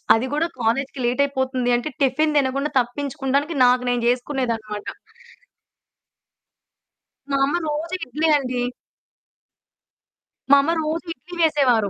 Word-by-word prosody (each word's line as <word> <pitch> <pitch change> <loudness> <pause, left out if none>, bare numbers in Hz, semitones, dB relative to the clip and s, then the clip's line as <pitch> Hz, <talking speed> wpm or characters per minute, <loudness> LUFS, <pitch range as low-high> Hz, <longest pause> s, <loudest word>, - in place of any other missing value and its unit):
అది 225 +3 0
గూడా 320 +3 +1
కాలేజికి 260 +4 -1
లేటయిపోతుంది 260 -1 0
అంటే, 245 +6 -3
టిఫిన్ 300 +4 +2
దినకుండా 275 +2 0
తప్పించుకుండానికి 275 +4 -1
నాకు 250 0 +4
నేను 245 -1 0
జేసుకునేదనమాట. 240 -5 -2 2.4
మా 275 - +1
అమ్మ 290 +5 -1
రోజు 310 +3 -3
ఇడ్లే 300 +6 -1
అండి. 255 -3 -2 1.9
మా 280 - +8
అమ్మ 320 - 0
రోజు 320 +3 -3
ఇడ్లీ 345 +7 -12
వేసేవారు. 255 -10 +3
270 Hz, 105 wpm, -22 LUFS, 245-295 Hz, 2.4 s, మా